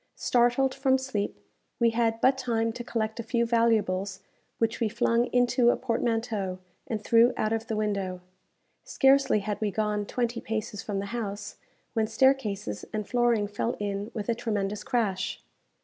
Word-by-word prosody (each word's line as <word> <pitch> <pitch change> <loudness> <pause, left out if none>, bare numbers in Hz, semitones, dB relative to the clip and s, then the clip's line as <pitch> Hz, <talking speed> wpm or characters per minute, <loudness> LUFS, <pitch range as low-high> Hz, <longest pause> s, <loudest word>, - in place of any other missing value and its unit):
Startled 245 +2 +2
from 265 -1 +2
sleep, 260 -6 -3 0.4
we 235 -1 +4
had 225 -1 +1
but 260 +1 +5
time 230 -3 -1
to 240 - -6
collect 220 -2 -2
a - - -2
few 235 +1 +1
valuables 205 -5 +1 0.4
which 225 0 0
we 225 - +1
flung 235 +1 +2
into 245 0 +3
a - - +3
portmanteau, 225 -5 -1 0.3
and 215 -2 -3
threw 235 +2 +5
out 215 +1 0
of 225 0 -2
the 220 - -2
window. 200 -4 -1 0.6
Scarcely 270 -5 +3
had 210 +1 -4
we 215 - +1
gone 210 0 -1
twenty 240 -1 -2
paces 215 -2 -4
from 205 -1 -4
the 195 - -2
house, 205 -3 -4 0.4
when 220 -2 +1
staircases 215 - +1
and 215 -1 -3
flooring 240 -4 +2
fell 205 +3 -2
in 205 0 -3
with 210 -3 -4
a 235 - +2
tremendous 210 -3 -2
crash. 205 -6 -1
225 Hz, 165 wpm, -27 LUFS, 205-240 Hz, 0.6 s, but